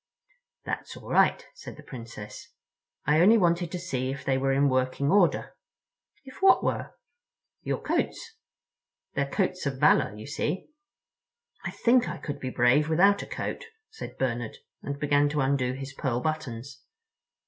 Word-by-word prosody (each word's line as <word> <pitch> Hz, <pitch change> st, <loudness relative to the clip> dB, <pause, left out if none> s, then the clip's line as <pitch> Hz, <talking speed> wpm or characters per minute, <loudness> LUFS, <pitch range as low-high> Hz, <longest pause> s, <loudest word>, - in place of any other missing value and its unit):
"That's -, -, -5 dB
all -, -, -11 dB
right," -, -, +3 dB
said -, -, -10 dB
the -, -, -12 dB
Princess. 115 Hz, -4 st, -9 dB, 0.6 s
"I 150 Hz, +3 st, +4 dB
only 215 Hz, +6 st, +7 dB
wanted 170 Hz, -3 st, +2 dB
to 180 Hz, -, -3 dB
see 130 Hz, -8 st, -3 dB
if 140 Hz, +1 st, -5 dB
they 135 Hz, -, +2 dB
were 135 Hz, +1 st, +1 dB
in 140 Hz, +1 st, +3 dB
working 130 Hz, +2 st, +1 dB
order." 195 Hz, -3 st, +2 dB, 0.7 s
"If 260 Hz, -, -12 dB
what 385 Hz, 0 st, +6 dB
were?" -, -, -2 dB, 0.7 s
"Your -, -, -2 dB
coats. 460 Hz, -2 st, -2 dB, 0.8 s
They're 140 Hz, 0 st, -1 dB
coats 185 Hz, -2 st, -1 dB
of 135 Hz, -1 st, -2 dB
valor, 135 Hz, -, +5 dB
of 105 Hz, -, -11 dB
course." 140 Hz, +8 st, -8 dB
"I 300 Hz, -, -7 dB
think 245 Hz, +1 st, +3 dB
I -, -, -5 dB
could 145 Hz, -2 st, -6 dB
be 130 Hz, -, -4 dB
brave 130 Hz, +5 st, +3 dB
without 195 Hz, +5 st, +4 dB
a -, -, -8 dB
coat," -, -, -4 dB, 0.3 s
said 445 Hz, -, -9 dB
Bernard, 120 Hz, -3 st, -2 dB, 0.2 s
and 140 Hz, 0 st, -4 dB
began 145 Hz, 0 st, +3 dB
to 150 Hz, 0 st, -1 dB
undo 135 Hz, -2 st, +1 dB
his 135 Hz, +1 st, -7 dB
pearl 130 Hz, -3 st, -1 dB
buttons. 140 Hz, -3 st, -4 dB
145 Hz, 160 wpm, -27 LUFS, 130-180 Hz, 0.8 s, only